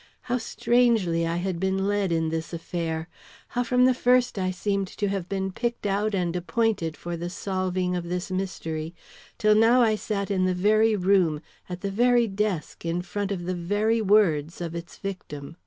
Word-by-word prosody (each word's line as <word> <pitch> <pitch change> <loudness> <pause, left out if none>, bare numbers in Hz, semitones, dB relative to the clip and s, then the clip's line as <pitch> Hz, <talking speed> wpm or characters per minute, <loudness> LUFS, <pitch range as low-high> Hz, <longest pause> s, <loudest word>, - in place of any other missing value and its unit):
How 250 0 -1
strangely 225 -9 +2
I 165 - -1
had 180 -1 -2
been 190 +1 0
led 205 -3 0
in 160 -1 +1
this 165 +1 -4
affair! 165 -1 -3 0.4
How 245 - 0
from 250 +1 +3
the 255 - +5
first 250 -3 +2
I 185 0 0
seemed 195 +1 -1
to 205 +2 -2
have 195 -3 -3
been 190 -1 -2
picked 235 +2 -3
out 205 +1 0
and 175 -2 -1
appointed 180 -2 0
for 175 0 -5
the 170 +1 -4
solving 185 -1 -2
of 175 -1 -3
this 180 +1 -3
mystery, 165 -4 -3 0.4
till 215 -3 +4
now 230 +3 +5
I 220 -2 +3
sat 205 -2 -2
in 185 -2 +2
the 185 0 +1
very 215 +4 +3
room, 180 -5 +2 0.3
at 180 0 -6
the 200 - -2
very 240 +3 +4
desk, 200 -5 -2
in 170 +1 -1
front 205 +2 -3
of 175 -3 -3
the 185 - -1
very 205 +6 +1
words, 185 -7 +3
of 170 -2 -4
its 170 0 -7
victim. 165 -6 -7
190 Hz, 190 wpm, -26 LUFS, 175-215 Hz, 0.4 s, the